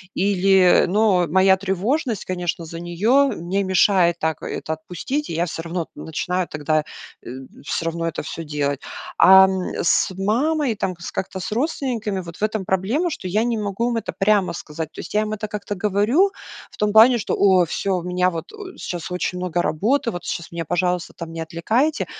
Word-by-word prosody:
или, 190 -1 +4
ну, 210 +5 +2 0.3
моя 190 +2 +5
тревожность, 205 - -1
конечно, 180 -1 -3
за 165 +1 -8
неё 215 +12 +2 0.2
мне 195 +3 0
мешает 185 -2 +3
так 160 -1 -2
это 160 - -4
отпустить, 180 - -4
и - - -4
я 165 +2 0
всё 165 -1 -5
равно 170 0 -3
начинаю 180 +3 -3
тогда 155 0 0 0.8
всё 165 - -2
равно 165 0 -2
это 165 - -4
всё 165 +2 -6
делать. 145 -2 -1 0.4
А, 190 0 +8
м, 190 -1 -3
с 175 - +2
мамой, 255 +6 +1
там 190 -3 -2 0.2
как-то 190 0 -4
с 185 - -5
родственниками 240 - -2
вот 170 -1 -10
в - - -6
этом 215 -2 0
проблема, 210 - 0
что 235 - -5
я 210 +5 +1
не 235 -1 0
могу 210 +3 -1
им 235 - -1
это 225 - -4
прямо 200 -2 +2
сказать. 160 -1 -6
То - - -12
есть - - -9
я 210 - +4
им 215 0 -3
это 215 0 -4
как-то 205 0 -5
говорю 215 - +3 0.4
в - - -16
том 210 0 0
плане, 235 +3 +7
что: 210 - -3
"О, 190 -3 +4
всё, 195 - -3
у 175 - -5
меня 180 +1 +1
вот 165 -2 -6 0.3
сейчас 175 0 -5
очень 180 0 -2
много 175 -1 -1
работы, 230 - 0
вот 175 - -6
сейчас 170 - -4
меня, 170 -1 -4
пожалуйста, 180 +2 -1
там 165 -1 -8
не 165 - -5
отвлекаете". 220 - 0
190 Hz, 190 wpm, -21 LUFS, 170-215 Hz, 0.8 s, А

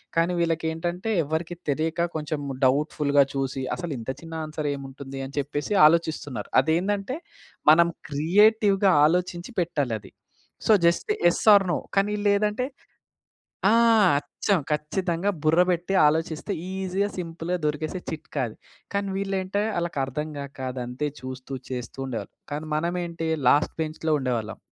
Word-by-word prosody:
కానీ 170 +2 +2
వీళ్ళకి 165 -1 0
ఏంటంటే, 175 +6 -3
ఎవరికీ 160 +4 -3
తెలియక 160 +4 0
కొంచెం 150 -1 -2 0.3
డౌట్‌పుల్‌గా 145 +1 +3
చూసి 135 -1 -2
"అసలు 175 -3 -5
ఇంత 115 - -7
చిన్న 165 0 -9
ఆన్సర్ 155 -1 -3
ఏముంటుంది" 135 0 -8
అని 135 - -10
చెప్పేసి 145 +7 -2
ఆలోచిస్తున్నారు. 155 -4 +1
అది 160 +4 +1
ఏందంటే, 205 - -1 0.5
మనం 170 +2 +6 0.2
క్రియేటివ్‌గా 195 +5 +4 0.2
ఆలోచించి 180 +4 -2
పెట్టాలి 145 -8 -1
అది. 95 - -15 0.6
So, - - +5 0.2
just 170 - +1 0.2
yes - - -3
are 195 -1 +4
no - - 0 0.2
కానీ 205 +1 +3
లేదంటే 210 +4 +2 1.0
ఆ! - - +4 0.5
అచ్చం 185 +5 0
ఖచ్చితంగా 170 +5 -1
బుర్ర 160 +3 +4
పెట్టి 175 +2 0
ఆలోచిస్తే 160 +5 -1 0.2
ఈజీగా, 190 +1 -1
సింపుల్‌గా 170 0 -3
దొరికేసే 155 +4 -2
చిట్కా 155 -3 -4
అది. 110 - -11 0.4
కానీ 200 0 0
వీళ్ళే 195 -1 -1
అంటే, 200 +2 -1
వాళ్ళకి 170 -4 -2
అర్థంగాక 145 0 -6 0.2
అది 125 - -5
అంతే 125 +5 -3
చూస్తూ 130 +1 -6 0.2
చేస్తూ 125 0 -5
ఉండేవాళ్ళు. 125 -4 -5 0.2
కానీ 150 +2 -4
మనమేంటి 170 0 -2 0.2
లాస్ట్ 145 - +3
బెంచ్‌లో 155 0 -2
ఉండేవాళ్ళం... 120 -4 -2
160 Hz, 135 wpm, -25 LUFS, 145-180 Hz, 1.0 s, మనం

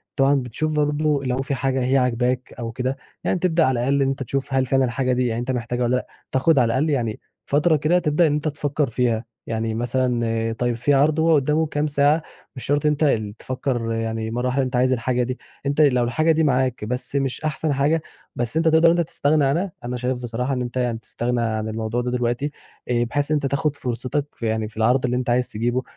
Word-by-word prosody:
طبعًا 135 +1 +4
بتشوف 140 +4 -2
برضه 150 -1 +1
لو 125 -1 -1
في 135 +1 -2
حاجة 130 0 0
هي 130 +2 +2
عاجباك 125 0 0
أو 115 -1 -4
كده 130 +3 -2 0.3
يعني 185 - 0
تبدأ 170 -2 +2
على 130 -2 +1
الأقل 140 +3 +1
إن 135 - +3
أنت 135 0 -2
تشوف 135 +2 -3
هل 130 -1 +2
فعلًا 135 +1 +2
الحاجة 125 +1 0
دي 125 0 +1
يعني 115 0 -1
أنت 120 +2 -2
محتاجها 125 0 -2
والَّا 120 +1 +2
لأ، 125 - -2 0.2
تاخد 140 +3 +3
على 125 - +4
الأقل 130 +7 +1
يعني 120 -7 -1 0.3
فترة 150 +3 +3
كده 155 +4 +2
تبدأ 160 +1 +2
إن 145 - +1
أنت 150 +1 -1
تفكر 145 -1 -1
فيها، 120 -1 0 0.2
يعني 110 0 -2
مثلًا 115 -1 0
طيب 120 -1 +1
في 135 +5 +1
عرْض 150 +3 +3
هو 160 0 +4
قدامه 150 +3 +2
كام 150 0 -1
ساعة 145 +2 +3 0.3
مش 130 - -7
شرط 145 +1 +1
إن 150 - +5
أنت 150 +1 -1
ال 110 -8 +1
تفكر 125 -3 -2
يعني 115 0 -2
مرّة 125 +2 -1
واحدة 130 +2 +1
أنت 130 0 -3
عايز 130 +1 +3
الحاجة 125 +1 0
دي، 125 +1 -3 0.3
أنت 140 +2 +1
لو 125 -4 +4
الحاجة 155 +8 +2
دي 160 0 +2
معاك 130 -5 +1
بس 125 +4 -3
مش 135 -2 -1
أحسن 155 0 -1
حاجة 145 +4 +2 0.3
بس 120 +5 -2
أنت 165 0 +2
تقدر 160 +1 +6
إن 170 - +1
أنت 170 - 0
تستغنى 150 -2 +2
عنها، 170 +8 0
أنا 125 +1 -3
شايف 125 0 -2
بصراحة 125 +3 -2
إن 125 - -1
أنت 120 0 -4
يعني 120 -2 0
تستغنى 120 +1 -2
عن 110 -1 -1
الموضوع 110 +2 -2
ده 125 0 -2
دلوقتي، 125 +3 -1 0.4
آآ، 120 -1 +2
بحيث 145 +5 -1
إن - - +4
أنت 145 - -1
تاخد 140 +2 0
فرصتك 130 +3 -2
في 115 - -3
يعني 110 0 -1
في 110 - -15
العرْض 125 +4 +3
اللي 125 0 0
أنت 125 -1 -2
عايز 125 +1 +2
تجيبه 120 +4 -1
130 Hz, 230 wpm, -22 LUFS, 120-145 Hz, 0.4 s, تقدر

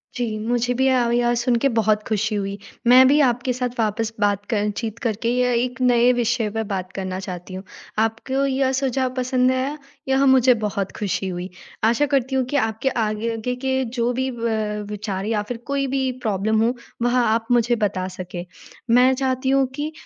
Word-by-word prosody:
जी, 230 -3 -2
मुझे 245 +1 +1
भी 265 +2 +1
अब 245 -2 +2
यह 240 0 +2
सुन 240 0 +1
के 275 - +4
बहुत 215 -1 +2
खुशी 215 0 0
हुई, 200 0 -3 0.3
मैं 255 +1 +8
भी 285 +3 +4
आपके 250 -1 +1
साथ 250 0 -2
वापस 225 +1 0
बात 205 -1 +1
क 210 -1 +1
चीत 225 -1 -4
करके 230 0 -1
य 250 0 +2
एक 250 +1 -2
नए 245 0 +4
विषय 235 -2 0
पे 225 +1 -2
बात 185 -1 -3
करना 185 -1 -4
चाहती 185 -1 -7
हूँ। 190 +1 -6 0.4
आपको 225 +5 0
यह 265 -1 +1
सुझाव 260 -1 -1
पसंद 255 0 +2
आया 265 +3 -1 0.3
यह 265 +1 +3
मुझे 260 -1 +6
बहुत 200 -2 -2
खुशी 195 -1 -2
हुई। 180 0 -4 0.3
आशा 235 +6 +3
करती 265 0 0
हूँ 260 - +1
कि - - -2
आपके 220 +1 0
आगे 225 +1 -2
के 265 +1 -1 0.2
जो 235 +1 +2
भी 260 +2 -1
ब 215 -2 -2
विचार 200 -2 -4
या 215 -1 0
फिर 245 - -3
कोई 280 -1 0
भी 265 -1 0
प्रॉब्लम 215 +1 +1
हो, 235 +2 +2 0.3
वह 245 +1 +2
आप 225 -1 +1
मुझे 240 0 +3
बता 195 -4 -1
सके। 180 -1 -7 0.4
मैं 250 +3 +5
चाहती 260 0 -1
हूँ 270 0 +4
कि 295 +2 -3
235 Hz, 190 wpm, -22 LUFS, 210-255 Hz, 0.4 s, मैं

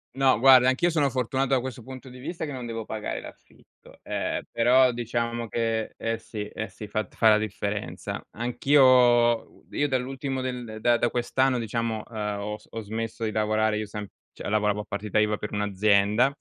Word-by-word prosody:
No 135 -4 +4
guarda, 130 0 +7
anch'io 165 +7 +2
sono 145 -4 +2
fortunato 130 +1 -1
da - - +2
questo 130 0 -6
punto 130 +2 -10
di 125 0 -12
vista 160 +4 -5
che 145 - -6
non 125 -3 -6
devo 115 -1 -5
pagare 105 - -4
l'affitto, - - -16
ehm, - - -2
però 125 +2 +4
diciamo 120 0 -2
che 115 -1 -2
eh 115 0 -2
sì, 115 -2 -7
eh 110 0 -6
sì, 105 +3 -9
fat 110 +1 -4
fa 110 - +5
la 105 - +5
differenza. 105 -1 -4
Anch'io 125 +5 +2 0.6
u - - -23
io 145 - 0
dall'ultimo 135 0 -2
del 125 -4 -5
da 120 -1 +4
da 120 - +1
quest'anno 130 +1 +1
diciamo, 115 -1 -2
ehm, 105 -2 -4
ho 105 +1 -4
s - - -22
ho 115 - -6
smesso 115 +2 -5
di 110 - 0
lavorare. 110 0 +1
Io 105 -1 -3
sem 105 0 -6 0.3
cioè - - -7
lavoravo 105 -1 +1
a - - -8
partita 105 +1 -3
IVA 105 -1 +2
per 105 - -6
un'azienda, 105 +5 +2
115 Hz, 190 wpm, -26 LUFS, 105-130 Hz, 0.6 s, guarda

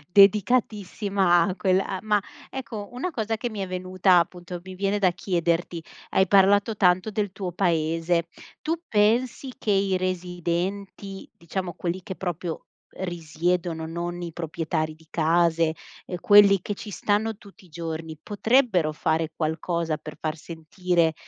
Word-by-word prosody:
Dedicatissima 200 -3 +4
a 185 - -2
quella 190 0 +2
a 190 - -3
ma, 210 -1 +2 0.3
ecco, 230 -6 -6
una 270 +9 -3
cosa 225 -5 -2
che 240 - -2
mi 215 -3 -6
è 190 - -2
venuta 185 0 +2
appunto, 175 +1 -3
mi 185 0 -9
viene 200 +2 0
da 185 -3 +4
chiederti 170 -1 -1 0.3
hai 190 - +3
parlato 200 +2 +4
tanto 185 +3 +3
del 205 -2 -2
tuo 190 -3 -4
paese, 165 -1 +1 0.3
tu 320 +2 0
pensi 235 +5 +1
che 210 - -2
i 195 -1 +2
residenti, 185 +2 -3
diciamo 175 +2 -4
quelli 175 +2 -3
che 190 -1 -6
proprio 175 -2 -4 0.3
risiedono, 170 -1 -2
non 175 +2 -4
i 170 -2 -5
proprietari 160 -1 -2
di 160 0 -22
case, 165 0 +2 0.3
ehm, 180 - -5
quelli 205 -2 +7
che 205 - -4
ci 210 +1 -8
stanno 210 +2 0
tutti 200 -3 -17
i 180 - -18
giorni, 160 -1 -5
potrebbero 210 - +2
fare 160 +1 0
qualcosa 160 0 -1
per 150 0 -10
far 155 0 -2
sentire 165 +1 -1
180 Hz, 145 wpm, -25 LUFS, 170-200 Hz, 0.3 s, quelli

